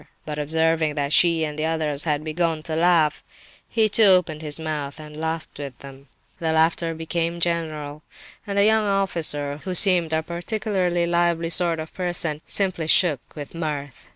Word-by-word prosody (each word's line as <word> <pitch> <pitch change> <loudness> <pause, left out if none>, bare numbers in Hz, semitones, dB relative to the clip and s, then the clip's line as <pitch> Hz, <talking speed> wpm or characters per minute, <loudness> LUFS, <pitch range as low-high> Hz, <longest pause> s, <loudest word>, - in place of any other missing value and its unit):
But 150 -1 -5
observing 160 0 +1
that 145 0 -1
she 165 -2 +4
and 150 0 -5
the 155 - 0
others 155 -2 -1
had 150 -2 0
begun 160 0 -1
to 160 -1 -3
laugh, 165 -2 +2 0.5
he 220 -1 +2
too 215 +1 +4
opened 180 -5 +3
his 150 0 -4
mouth 155 -2 -4
and 150 -1 -10
laughed 160 -1 -4
with 140 -3 -7
them. 140 0 -13 0.3
The 160 -1 -1
laughter 165 +1 +1
became 165 +1 -2
general, 155 -3 -2 0.5
and 200 0 -3
the 200 - +5
young 220 0 +3
officer, 165 -7 0
who 185 -1 -3
seemed 175 -3 +4
a 160 0 0
particularly 175 0 -1
lively 170 -1 +1
sort 170 -2 +2
of 155 0 -7
person, 175 -4 -2
simply 185 -5 0
shook 160 -4 +4 0.2
with 145 -2 -8
mirth. 150 -5 -5
160 Hz, 170 wpm, -23 LUFS, 150-175 Hz, 0.5 s, the